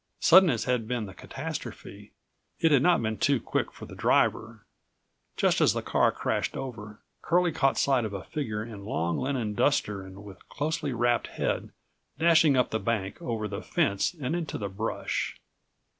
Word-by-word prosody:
Sudden 185 +1 +7
as 115 -5 0
had 125 -3 -1
been 120 -2 -2
the 95 - -10
catastrophe, - - -7 0.5
it 165 - +3
had 140 -4 +5
not 175 -4 +3
been 110 -1 -2
too 140 -3 +3
quick - - -2
for - - -10
the - - -12
driver. - - +1 0.7
Just - - +2
as - - +5
the - - -3
car - - +2
crashed - - -2
over, 110 -5 -7 0.2
Curlie 175 0 +2
caught 135 -3 +1
sight 135 -3 +2
of 110 - -3
a 100 -2 -6
figure 110 -8 -4
in 105 -4 -9
long 85 -5 -1
linen 125 -6 -2
duster 105 -5 +1
and 95 +1 -11
with 100 -2 -13
closely 150 0 -2
wrapped 120 0 +1
head, - - -2 0.5
dashing 160 -3 +5
up 125 - +2
the 110 - 0
bank, 110 -5 -2
over 110 -3 -3
the 100 -1 -5
fence 100 - 0
and 135 +3 -2
into 170 -3 -3
the 100 -2 -4
brush. 105 +4 -3
120 Hz, 175 wpm, -28 LUFS, 105-145 Hz, 0.7 s, Sudden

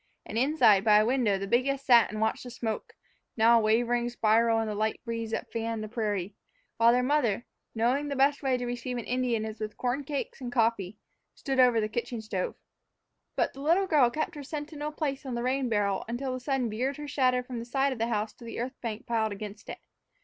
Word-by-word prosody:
And, - - -8
inside, 235 -6 +4
by 210 -2 +6
a 215 - +4
window, 235 -5 +2
the 195 - -4
biggest 265 +6 0
sat 240 -3 +6
and 215 - -5
watched 220 0 0
the 250 - -8
smoke, 230 -3 -4 0.4
now 230 +1 +6
a - - 0
wavering 240 +2 +2
spiral 230 0 +3
in 225 - 0
the 215 - -2
light 215 +1 -1
breeze 230 -1 -3
that 220 - -4
fanned 225 -1 -3
the - - -5
prairie; 210 -4 -2 0.4
while 230 +1 +6
their 250 +1 +2
mother, 250 -6 +1 0.3
knowing 250 +6 +1
that 280 - -3
the - - -6
best 280 +2 +3
way 265 -3 +1
to 245 - -4
receive 245 +1 -4
an 240 - -4
Indian 245 -3 0
is 220 0 -7
with 215 -1 -5
corn 255 +3 -1
cakes 280 -1 -4
and 245 -1 -5
coffee, 225 -5 0 0.4
stood 270 -1 -2
over 245 -3 +5
the 215 - 0
kitchen 235 +2 -4
stove. 210 -4 -3 0.8
But - - 0
the 275 - -10
little 340 +7 +3
girl 295 -9 +4
kept 310 +7 -3
her 295 - -7
sentinel 295 +1 -5
place 285 -3 -3
on 260 -3 -4
the 235 - -2
rain 260 0 0
barrel 205 -3 0
until 255 +3 -3
the 255 - -4
sun 260 -1 -1
veered 250 +6 -2
her 295 0 -7
shadow 255 -3 +2
from 250 -1 -6
the 230 - -6
side 270 +2 +1
of 245 - -10
the 230 - +1
house 215 -2 -2
to - - -16
the 230 - -6
earth 255 +3 -5
bank 225 -2 -5
piled 220 -2 0
against 205 +1 -8
it. - - -5
240 Hz, 230 wpm, -28 LUFS, 220-265 Hz, 0.8 s, by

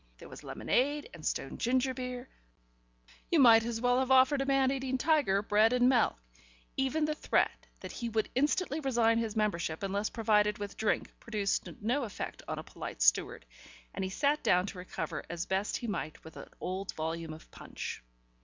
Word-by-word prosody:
There - - -12
was - - -11
lemonade 290 +4 0
and 170 -2 -11
stone 135 - -3
ginger 260 +2 +1
beer.... 250 0 -5 1.0
You 340 - +3
might 230 -4 +8
as 230 -1 -3
well 245 +1 +2
have 260 0 0
offered 265 +2 +5
a 270 - -2
man 270 -1 +3
eating 265 -1 -1
tiger 260 -9 +2
bread 215 +3 +4
and 250 0 +4
milk. 240 - +3 0.6
Even 275 +4 +1
the 305 - 0
threat - - 0
that - - -7
he 235 -2 -4
would 220 -1 0
instantly 295 +3 +1
resign 235 -5 +2
his 225 -2 -3
membership 180 -6 -1
unless 200 +2 -1
provided 210 -2 +2
with 205 -1 -6
drink 220 - -1
produced 210 -4 -1
no 250 +6 0
effect 210 -5 -6
on - - -3
a - - -5
polite - - -5
steward, - - +2 0.5
and - - -3
he 190 - -2
sat 290 +9 +1
down 180 +1 +3
to 195 -2 -7
recover 180 - -5
as 175 +1 -3
best 190 +2 -1
he - - -7
might 200 -8 -4
with 160 - -12
an - - -10
old 190 +2 -4
volume 160 +1 -3
of 155 0 -12
Punch. - - -7
230 Hz, 185 wpm, -31 LUFS, 195-260 Hz, 1.0 s, might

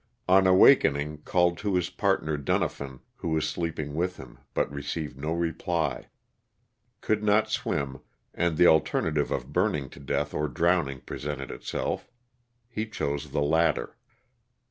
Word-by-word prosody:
On 95 +1 +5
awakening 75 - +5
called 90 -1 +2
to 100 -2 -1
his 90 -1 0
partner 95 -6 0
Dunafin, 70 -1 -2 0.2
who - - -4
was 80 -1 +1
sleeping 80 -2 -3
with 90 +4 -1
him, 60 -2 -12 0.2
but - - 0
received 75 0 -4
no 75 +4 -4
reply. 85 -3 -1 0.9
Could 110 -1 +1
not 110 +1 +3
swim, 70 - -2 0.3
and 85 -2 0
the 90 - +6
alternative 80 -2 +3
of - - -3
burning 70 -3 +1
to - - -12
death 70 +1 -2
or 75 +1 0
drowning 75 -2 +1
presented 70 -3 -5
itself. - - -4 0.6
He 110 -2 -4
chose 70 -8 -3
the 70 +1 0
latter. 80 -4 +1
80 Hz, 140 wpm, -27 LUFS, 70-90 Hz, 0.9 s, the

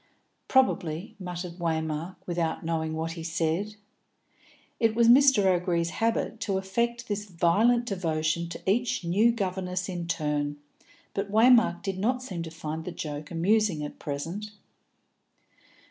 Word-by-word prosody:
"Probably," 185 -9 +1
muttered 180 -1 -6
Waymark, 160 +1 -2
without 170 -2 -2
knowing 160 -1 -1
what 160 +1 -2
he 165 0 -7
said. 165 +5 -1 1.0
It 225 -1 +2
was 235 0 +4
Mr. 265 -4 +6
O'Gree's 175 -2 +1
habit 225 0 -1
to 205 -3 -1
affect 235 +5 -1
this 205 0 -2
violent 205 +7 +3
devotion 170 -4 -1
to - - -7
each 230 +1 +1
new 200 +8 +3
governess 185 -4 -2
in 175 -3 -4
turn, 150 -2 -1 0.6
but 200 0 -2
Waymark 225 -5 +5
did 195 -1 -3
not 250 +5 0
seem 185 -9 -5
to 165 - -5
find 160 0 -5
the 180 - -5
joke 150 -3 -6
amusing 180 -1 +1
at 145 - -7
present. 165 +9 -4
180 Hz, 135 wpm, -27 LUFS, 165-215 Hz, 1.0 s, Mr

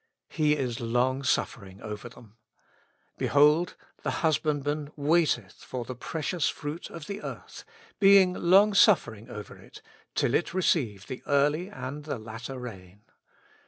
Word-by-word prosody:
"He 150 -2 +2
is 125 -4 -2
long 125 +3 0
suffering 100 -7 -2
over 105 +2 -6
them." 115 -2 -17 0.8
"Behold! 150 +4 +4 0.3
the - - -2 0.2
husbandman 150 -1 0
waiteth 145 - +1
for 125 -2 -5
the 130 - -5
precious 160 +6 -2
fruit 150 +3 -6
of 165 -3 -9
the 200 +1 -6
earth, - - -8 0.4
being 195 -2 +6
long 195 +4 +5
suffering 120 - +3
over 105 - -8
it, - - -14 0.4
till 120 - +1
it 170 +3 0
receive 120 - +1
the 130 - -7
early 150 +5 +2
and 145 -6 -7
the 145 -3 -3
latter 115 +4 -7
rain." 100 -5 -10
140 Hz, 135 wpm, -28 LUFS, 120-165 Hz, 0.8 s, being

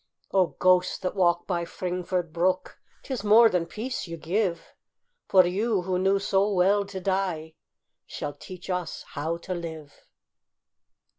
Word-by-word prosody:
O 190 -2 +4
ghosts 180 0 +2
that 185 - -3
walk 175 -2 +2
by 175 -2 -1
Fringford 180 -1 -3
brook, 180 +2 0 0.2
'Tis 255 -7 -4
more 220 +2 +7
than 175 -4 0
peace 220 +5 -4
you 165 0 -6
give, 175 +1 -2 0.5
For 185 -2 +6
you, 200 +2 0
who 180 0 -1
knew 195 +1 +3
so 195 +1 +1
well 200 +2 +3
to 195 -1 -6
die, 185 -4 -1 0.5
Shall 145 - -5
teach 180 +3 -11
us 180 -2 -3
how 160 +3 -3
to 185 +2 -5
live. 160 -4 -7
185 Hz, 145 wpm, -26 LUFS, 170-195 Hz, 0.5 s, more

